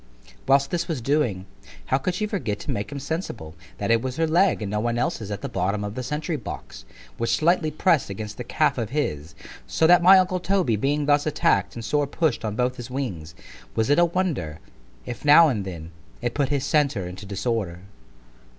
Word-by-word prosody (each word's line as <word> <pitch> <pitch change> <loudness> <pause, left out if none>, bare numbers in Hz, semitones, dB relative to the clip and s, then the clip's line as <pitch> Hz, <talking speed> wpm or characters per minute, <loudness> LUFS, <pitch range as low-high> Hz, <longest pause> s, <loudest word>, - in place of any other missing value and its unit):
Whilst 140 +1 +3
this 170 -1 -1
was 160 -5 -2
doing, 120 -8 0 0.4
how 130 - +1
could 180 +6 -2
she 215 - -1
forget 185 - -2
to - - -4
make 105 +5 -3
him 140 - -5
sensible, 135 - -5 0.2
that - - -1
it 115 -1 +4
was 130 0 -4
her 165 - +1
leg 170 - +2
(and 100 - -4
no 105 - 0
one's 120 +2 -1
else) 150 +2 -1
at 100 - -5
the - - -3
bottom 100 +3 -1
of 105 0 -4
the 130 - -4
sentry 150 +5 -3
box, 120 - -8 0.3
which 115 0 +1
slightly 170 0 +2
press'd 155 - +2
against 105 +2 -6
the 125 - -4
calf 150 +1 +1
of 115 - -2
his——So 80 - -3
that 175 +2 +6
my 190 +2 +8
uncle 185 0 +2
Toby 180 - +1
being 145 +7 0
thus 145 +1 +3
attack'd 95 -10 +1
and 115 -1 -6
sore 145 +2 +1
push'd 150 -4 0
on 105 -2 -3
both 125 +2 0
his 120 0 -7
wings——was 110 - -4
it 145 - +4
a 175 - +6
wonder, 165 - -2 0.5
if 120 - -7
now 150 +2 +7
and 105 -7 -2
then, 85 -3 -7 0.3
it 120 -1 -2
put 140 -3 0
his 140 -2 0
centre 140 - +1
into 95 +3 -9
disorder? 100 -3 -2
130 Hz, 205 wpm, -24 LUFS, 105-155 Hz, 0.5 s, my